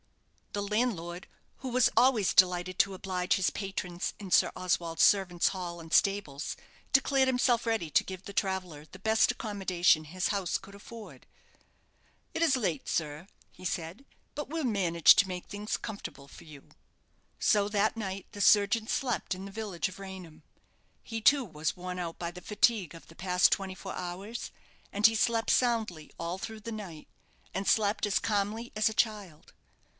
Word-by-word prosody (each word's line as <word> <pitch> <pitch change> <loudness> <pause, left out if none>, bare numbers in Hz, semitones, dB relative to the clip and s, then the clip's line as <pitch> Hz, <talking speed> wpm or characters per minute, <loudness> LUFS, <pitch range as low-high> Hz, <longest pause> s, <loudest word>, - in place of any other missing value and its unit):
The 205 - -2
landlord, 200 -5 -2 0.3
who 260 - -6
was 245 0 +4
always 245 -7 +4
delighted 180 0 +3
to 195 -1 +3
oblige 185 -1 -1
his 190 -1 +1
patrons 185 -3 -4
in 195 -3 -8
Sir - - +5
Oswald's 175 -2 0
servants' 185 -4 +4
hall 175 -3 -5
and 165 -1 -9
stables, 195 -9 +1 0.3
declared 270 -1 +3
himself 245 -2 +2
ready 225 -8 0
to - - +4
give 185 0 -8
the 200 - -9
traveller 185 -7 -2
the 185 +4 -14
best 220 +2 +3
accommodation 185 -6 +1
his 180 +4 -2
house 195 -4 0
could 200 0 -14
afford. 200 - -11 1.1
"It's 325 -5 +2
late, 175 - -2
sir," 155 +2 -2 0.2
he - - -16
said; 170 +5 -4 0.3
"but 295 -2 -5
we'll 320 -1 -2
manage 180 -8 +5
to 200 - +4
make 180 -1 -5
things 205 +1 -4
comfortable 200 -9 -8
for - - -14
you." 150 -4 -14 0.7
So 205 -1 +3
that 210 +1 +1
night 195 -3 -5
the 205 - -6
surgeon 210 +3 +4
slept 245 -5 -1
in 190 +1 -8
the 200 - -8
village 200 -5 -3
of 190 0 -11
Raynham. 185 -5 -9 0.6
He, 225 -1 -5
too, 275 +3 +5
was 155 -4 -3
worn 180 0 -5
out 170 -2 -4
by 170 -1 -4
the 180 +1 -10
fatigue 210 -5 +1
of 165 - -13
the 165 - -16
past 180 +1 +3
twenty 190 -2 -1
four 190 0 -7
hours, 190 +6 -6 0.4
and 205 +1 +1
he 225 0 +7
slept 225 0 +2
soundly 220 -11 0
all 170 +3 -4
through 220 +2 -7
the 230 +2 -6
night, 190 -8 -8 0.5
and 195 +1 -3
slept 210 -1 +2
as 200 - +2
calmly 215 +2 -2
as 215 0 +3
a - - -5
child. 205 -9 -2
195 Hz, 170 wpm, -30 LUFS, 175-220 Hz, 1.1 s, he